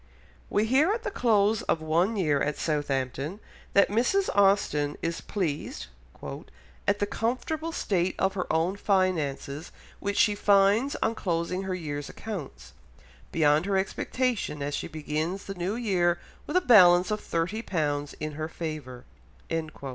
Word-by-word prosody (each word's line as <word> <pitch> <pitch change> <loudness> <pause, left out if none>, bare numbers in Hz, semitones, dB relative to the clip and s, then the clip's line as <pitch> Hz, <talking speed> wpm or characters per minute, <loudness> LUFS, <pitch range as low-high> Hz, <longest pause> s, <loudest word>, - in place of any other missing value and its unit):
We 210 - +2
hear 275 - +3
at 455 0 -4
the 415 - -3
close 215 - +2
of - - 0
one 170 +7 +1
year 150 -8 +1
at 150 0 -1
Southampton 145 +2 -2 0.3
that 200 - +5
Mrs. 250 - +1
Austen 195 -8 +3
is 165 0 -2
pleased 155 - -3 1.0
"at 205 - +3
the 205 - 0
comfortable 255 +10 -2
state 185 - 0
of 190 0 +1
her 185 -2 -3
own 165 +5 +1
finances, 165 -7 0 0.3
which 200 0 -2
she 210 - +5
finds 205 +6 +3
on - - +1
closing 180 -2 -2
her 185 -1 -2
year's 145 -5 -5
accounts, 200 -11 -7 0.6
beyond 155 +2 +3
her 195 -1 +2
expectation, 205 - -1
as 145 +1 -3
she - - -3
begins 155 +5 -3
the 195 - -5
new 185 +3 -2
year 180 -7 +1 0.3
with 300 - +1
a - - +4
balance 180 - +6
of 210 - -1
thirty 175 +7 -2
pounds 145 -7 -2
in 155 0 -3
her 155 +1 -4
favour." 155 -7 -6
185 Hz, 145 wpm, -27 LUFS, 155-210 Hz, 1.0 s, balance